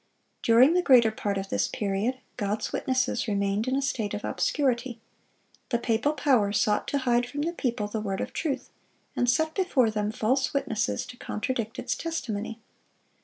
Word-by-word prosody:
During 245 +7 +6
the 360 - +3
greater 245 -8 +6
part 215 -4 -2
of 195 0 -4
this - - +1
period, 210 +5 -1 0.2
God's 210 -1 -2
witnesses 260 -1 0
remained 200 +2 0
in 260 - +1
a 275 - 0
state 220 -6 -1
of 210 - -5
obscurity. 250 -4 0 0.7
The 235 - +2
papal 235 +5 +1
power 255 -10 +2
sought 210 0 +1
to 285 - 0
hide 245 -2 +1
from 290 +4 -3
the 340 +2 -1
people 240 -9 -1
the 215 +1 -3
Word 195 -2 -3
of - - -4
truth, 300 -5 -3 0.4
and 245 - +2
set 315 +5 +2
before 285 - +2
them 210 0 -1
false 260 +6 0
witnesses 235 -3 -1
to 245 - -11
contradict 230 -1 -3
its - - -2
testimony. 225 -9 -4
240 Hz, 170 wpm, -27 LUFS, 215-265 Hz, 0.7 s, During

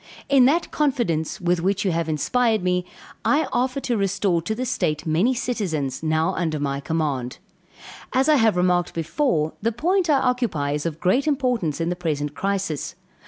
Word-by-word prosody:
In 270 -2 +6
that 325 +6 +2
confidence, 235 - 0
with 175 -1 +1
which 195 +3 0
you 190 - +2
have 165 -1 -1
inspired 220 - +1
me, 180 0 0 0.4
I 300 +2 +2
offer 255 +2 0
to 245 - -1
restore 195 -3 +1
to 220 +7 -3
the 255 +3 -3
state 150 - -1
many 175 +11 +2
citizens, 180 - -2
now 160 0 +1
under 160 -3 -1
my 140 -1 -2
command. 140 -5 -2 0.7
As 265 +2 +2
I 305 -1 +5
have 225 -6 +3
remarked 180 -1 +1
before, 165 - 0
the 230 +2 +1
point 350 - 0
I 290 - +5
occupy 240 - 0
is 150 +2 -1
of 160 -1 -5
great 245 - +2
importance 250 - 0
in 165 0 0
the 180 - -1
present 150 -4 -2
crisis. 195 -4 -2
180 Hz, 175 wpm, -23 LUFS, 160-250 Hz, 0.7 s, In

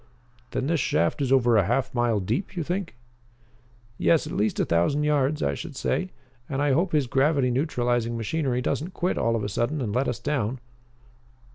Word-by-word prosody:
"Then - - -2
this 165 +2 +1
shaft 85 - +1
is 135 -2 0
over 120 -4 +4
a 100 - +3
half 120 +6 0
mile 120 -3 +1
deep, 120 - -2
you 170 - 0
think?" 180 -2 -3 1.0
"Yes, 165 - +3
at - - -6
least 105 +1 0
a - - +2
thousand 85 - +1
yards, 150 0 +1
I - - +1
should 160 -4 -7
say. 185 +7 -1 0.4
And 135 - -2
I 145 0 +2
hope 170 +6 +2
his 150 -3 +2
gravity 135 0 +2
neutralizing 120 -4 0
machinery 125 +1 -1
doesn't 170 +9 -2
quit 180 +1 0
all 115 0 +1
of 110 - -2
a - - -1
sudden 120 +9 -1
and 110 -6 -2
let 130 +3 +1
us 125 - -1
down." 125 -1 -2
130 Hz, 190 wpm, -25 LUFS, 120-150 Hz, 1.0 s, over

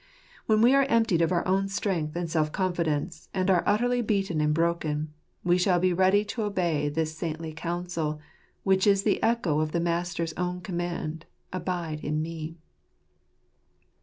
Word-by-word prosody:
When 215 -1 +4
we 245 +3 +6
are 275 0 +5
emptied 225 -7 +3
of 165 +1 +2
our 175 0 +1
own 195 +1 +2
strength 175 -6 -1
and 175 0 -2
self 155 -2 0
confidence, 170 -3 -2
and 190 0 +2
are 175 -2 +4
utterly 245 +4 +2
beaten 195 -7 0
and 150 0 +2
broken, 155 -2 0 0.3
we 175 +1 +3
shall 180 -1 +3
be 185 0 +2
ready 190 +3 +3
to 225 +2 -4
obey 175 -8 0
this 155 +1 -2
saintly 160 -1 -4
counsel, 165 -2 -3 0.4
which 190 0 +3
is 200 -1 +4
the 210 - +1
echo 210 -10 +1
of 155 0 -1
the 170 - +1
Master's 170 -1 -1
own 180 +1 -2
command 170 -2 -4
— - - -45
" - - -18
Abide 175 -4 -3
in 150 0 -2
Me 165 0 -6
175 Hz, 170 wpm, -27 LUFS, 160-190 Hz, 0.4 s, we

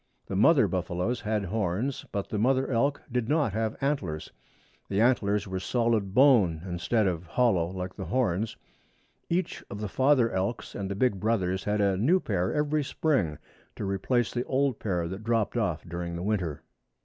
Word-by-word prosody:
The 95 - -5
mother 130 - +5
buffaloes 90 +5 -2
had 105 -1 -1
horns, 110 +6 -2
but 100 -1 -3
the 105 - -2
mother 130 +4 +2
elk 135 +4 +1
did 120 -2 -1
not 145 -8 +2
have 110 0 -1
antlers. 105 - -2 0.6
The 100 - 0
antlers 105 -4 +2
were 95 0 -3
solid 110 -2 0
bone 110 - +5
instead 95 +5 0
of 90 -2 -2
hollow 95 -4 +2
like 90 0 -5
the - - -6
horns. 110 -4 0 0.7
Each 180 +2 -1
of 100 - -6
the 105 - -3
father 130 0 +3
elks 95 +5 -2
and 95 -1 -4
the 100 - -3
big 105 -2 +1
brothers 95 -4 0
had 105 0 +1
a 100 -2 +2
new 155 - +3
pair 95 - -1
every 150 0 +1
spring 130 - 0 0.4
to - - -4
replace 105 +5 0
the 120 - -1
old 135 -2 0
pair 90 -5 -1
that 95 +5 -6
dropped 115 -1 0
off 100 -9 -1
during 85 0 -4
the 85 - -4
winter. 95 -8 -2
105 Hz, 175 wpm, -28 LUFS, 95-125 Hz, 0.7 s, mother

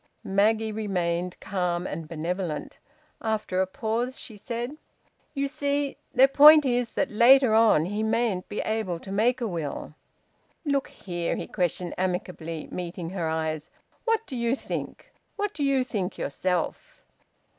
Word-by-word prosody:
Maggie 220 +3 +2
remained 180 -4 -2
calm 180 -2 -1
and 165 -3 -5
benevolent. 165 0 -4 0.4
After 215 -4 0
a 190 - +1
pause 230 +6 -2
she 220 - -8
said 240 +6 -4 0.6
"You 280 0 0
see 285 0 -1 0.2
their 265 +2 +6
point 300 +2 +8
is 245 -2 +1
that - - 0
later 240 +2 +6
on 220 -8 +5
he 205 +4 -2
mayn't 220 -4 0
be 205 - -2
able 215 -6 -1
to 190 - -9
make 240 +6 +2
a 235 - 0
will." 165 -7 -4 0.8
"Look 280 -2 +1
here," 175 -2 -3
he - - -4
questioned 175 0 -2
amicably, 180 -3 -3
meeting 175 -1 -5
her 175 -4 -2
eyes, 160 0 -2 0.4
"what 455 -1 +1
do 265 - -7
you 235 +1 +1
think? - - -6 0.2
What 415 -1 -2
do 295 - -3
you 275 -2 +3
think 205 -7 -3
yourself?" 180 +4 -2
210 Hz, 145 wpm, -26 LUFS, 180-245 Hz, 0.8 s, point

